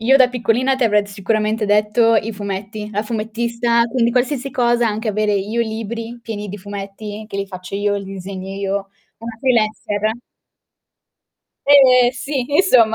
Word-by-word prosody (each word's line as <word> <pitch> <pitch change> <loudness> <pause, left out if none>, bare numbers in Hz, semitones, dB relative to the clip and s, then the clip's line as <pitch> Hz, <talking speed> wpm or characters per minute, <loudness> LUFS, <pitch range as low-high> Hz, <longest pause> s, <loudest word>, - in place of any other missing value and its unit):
io 255 +4 +5
da 255 -2 +6
piccolina 250 +2 +1
ti 260 - +1
avrei 210 -2 +3
sicuramente 215 +2 -1
detto 210 +2 +3
i 220 +1 0
fumetti, 205 +1 -5
la 210 0 -1
fumettista, 235 +2 0
quindi 235 -2 +2
qualsiasi 255 +2 0
cosa, 240 -1 +2
anche 215 +1 -3
avere 210 0 +1
io 205 +4 -1
libri 230 +1 -5
pieni 210 -3 -6
di 205 +2 -6
fumetti, 205 +2 -7
che 205 - -7
li 200 - -2
faccio 185 0 -8
io, 205 0 0
li 200 - -5
disegno 190 0 -7
io, 195 0 -2 0.4
una 230 -1 -7
freelancer. 215 -3 0 1.5
Eh, 255 -3 +7
sì, 270 0 -3
insomma 245 -11 +5
220 Hz, 155 wpm, -19 LUFS, 205-240 Hz, 1.5 s, Eh